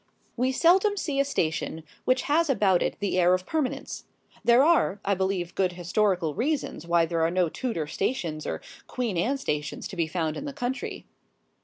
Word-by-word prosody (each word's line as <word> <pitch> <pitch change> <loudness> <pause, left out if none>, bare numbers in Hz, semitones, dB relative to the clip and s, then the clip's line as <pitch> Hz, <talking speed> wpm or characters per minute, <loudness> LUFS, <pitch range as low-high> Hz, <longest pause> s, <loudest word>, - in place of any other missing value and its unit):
We 255 +2 +1
seldom 375 +9 +4
see 290 -7 -1
a - - +5
station 160 - -2 0.2
which 255 0 +2
has 320 +2 +2
about 200 -8 +3
it - - 0
the 195 -2 0
air 180 +1 +5
of 185 0 -5
permanence. 300 -1 -3 0.4
There 240 +2 +6
are, 305 - +3
I 200 - +2
believe 190 -2 -1
good 185 -2 +1
historical 175 -2 0
reasons 260 - -2
why 170 -1 +4
there 165 0 -1
are 165 - +3
no 180 -1 +1
Tudor 225 -7 -3
stations 160 - -2
or - - -4 0.2
Queen 240 -6 -2
Anne 235 +12 +1
stations 150 - -3
to - - -7
be 165 -3 0
found 160 -2 -2
in - - -5
the 285 - -5
country. 260 -1 -4
195 Hz, 185 wpm, -26 LUFS, 170-265 Hz, 0.4 s, There